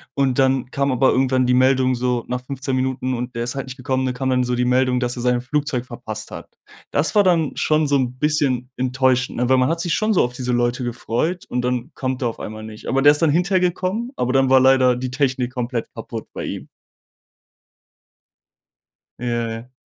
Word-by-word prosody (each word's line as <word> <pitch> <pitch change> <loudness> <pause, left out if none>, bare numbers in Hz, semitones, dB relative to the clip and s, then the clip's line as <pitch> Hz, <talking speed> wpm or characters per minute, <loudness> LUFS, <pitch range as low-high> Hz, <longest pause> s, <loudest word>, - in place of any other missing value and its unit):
und 135 -2 +1
dann 130 -1 +2
kam 140 -1 0
aber 130 +1 +3
irgendwann 130 -1 +2
die 125 - +3
Meldung 130 0 +3
so 125 -1 -1
nach 125 0 -3
15 135 0 -3
Minuten 130 0 -1
und 125 +1 -4
der 115 - -2
ist 125 - -3
halt 135 -1 -4
nicht 130 +1 -8
gekommen, 130 0 -1
dann 125 -1 -2
kam 130 +1 -2
dann 125 -1 +2
so 125 0 -1
die 125 0 0
Meldung, 125 0 +2
dass 125 -1 -2
er 120 - -5
sein 125 0 +2
Flugzeug 130 -1 -2
verpasst 110 -3 -7
hat. - - -9 0.4
Das 150 +8 0
war 205 - +6
dann 165 -5 +2
schon 155 -1 +1
so 140 - +2
'n 125 -2 -1
bisschen 140 -5 0
enttäuschend, 130 0 +1
ne? 125 0 +1
Weil 130 - +4
man 130 +1 +2
hat 165 +1 -1
sich 170 -1 -1
schon 215 0 +1
so 185 - +4
auf 125 - -6
diese 125 0 -3
Leute 120 +1 0
gefreut 120 +8 -2
und 125 - -2
dann 125 +3 -2
kommt 130 0 -3
er - - +2
auf 115 - -5
einmal 110 0 -7
nicht. 110 -1 -10
Aber 135 - +1
der 145 +1 +7
ist 150 - -4
dann 160 - +4
hinterher 180 +4 +2
gekommen, 185 +6 -1
aber 125 +1 0
dann 135 -1 +3
war 130 0 +6
leider 130 -1 +4
die 125 0 -4
Technik 130 -2 -1
komplett 120 -2 -3
kaputt - - -7
bei - - -5
ihm. - - -6 2.5
Ja, 120 -1 -1
ja. 115 +3 -8
130 Hz, 220 wpm, -21 LUFS, 125-140 Hz, 2.5 s, der